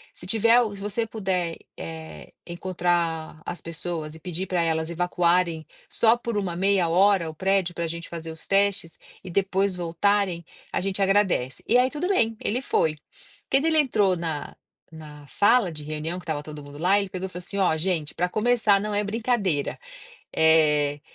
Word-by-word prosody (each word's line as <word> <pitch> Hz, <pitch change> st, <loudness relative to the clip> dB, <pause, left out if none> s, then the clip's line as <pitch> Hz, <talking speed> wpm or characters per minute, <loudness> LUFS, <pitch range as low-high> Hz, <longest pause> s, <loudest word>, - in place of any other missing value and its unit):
se 175 Hz, -, -10 dB
tiver 230 Hz, +4 st, +4 dB
o 215 Hz, -3 st, -2 dB
se 195 Hz, -, -10 dB
você 210 Hz, +3 st, -1 dB
puder, 185 Hz, -6 st, -2 dB, 0.2 s
eh, 160 Hz, -1 st, -8 dB, 0.2 s
encontrar 170 Hz, -3 st, -2 dB
as 175 Hz, -, -4 dB
pessoas 165 Hz, -1 st, -4 dB
e -, -, -12 dB
pedir 180 Hz, +1 st, -3 dB
para 180 Hz, -2 st, 0 dB
elas 160 Hz, 0 st, 0 dB
evacuarem 175 Hz, -1 st, +1 dB, 0.2 s
só 230 Hz, 0 st, +4 dB
por 235 Hz, -3 st, -3 dB
uma 180 Hz, -4 st, -2 dB
meia 190 Hz, -1 st, +2 dB
hora 185 Hz, -1 st, +3 dB
o 155 Hz, -, -9 dB
prédio 190 Hz, -1 st, 0 dB
para 170 Hz, -1 st, -2 dB
gente 170 Hz, +1 st, -6 dB
fazer 165 Hz, -1 st, -6 dB
os 160 Hz, -, -10 dB
testes 195 Hz, -4 st, +1 dB, 0.3 s
e 185 Hz, -, -8 dB
depois 195 Hz, +1 st, +1 dB
voltarem, 175 Hz, 0 st, 0 dB, 0.3 s
a -, -, 0 dB
gente 195 Hz, +1 st, -1 dB
agradece", 195 Hz, -10 st, +1 dB
e 245 Hz, -, +5 dB
aí 255 Hz, +1 st, +4 dB
tudo 310 Hz, +6 st, -3 dB
bem, 225 Hz, -, +1 dB
ele 245 Hz, +5 st, -1 dB
foi, 155 Hz, -, +1 dB, 0.5 s
quando 270 Hz, +3 st, +3 dB
ele 320 Hz, -1 st, +3 dB
entrou 210 Hz, -9 st, +2 dB
na 160 Hz, -3 st, -4 dB, 0.4 s
na 150 Hz, -2 st, -12 dB
sala 205 Hz, -, +3 dB
de 150 Hz, -1 st, -7 dB
reunião 155 Hz, +4 st, -4 dB
que -, -, -13 dB
estava 155 Hz, -3 st, -3 dB
todo 150 Hz, -1 st, -9 dB
mundo 145 Hz, 0 st, -11 dB
lá, 185 Hz, +5 st, +3 dB
ele 200 Hz, -1 st, -3 dB
pegou 185 Hz, +1 st, -4 dB
e -, -, -13 dB
falou 180 Hz, -, -7 dB
assim: 195 Hz, +3 st, -3 dB
"Olha 175 Hz, -5 st, +2 dB
gente, 160 Hz, -3 st, -1 dB
para 180 Hz, 0 st, 0 dB
começar 215 Hz, -1 st, +3 dB
não 210 Hz, 0 st, -3 dB
é 205 Hz, -, +1 dB
brincadeira, 205 Hz, -, -1 dB, 0.6 s
eh, 150 Hz, -2 st, +3 dB
180 Hz, 185 wpm, -25 LUFS, 160-200 Hz, 0.6 s, e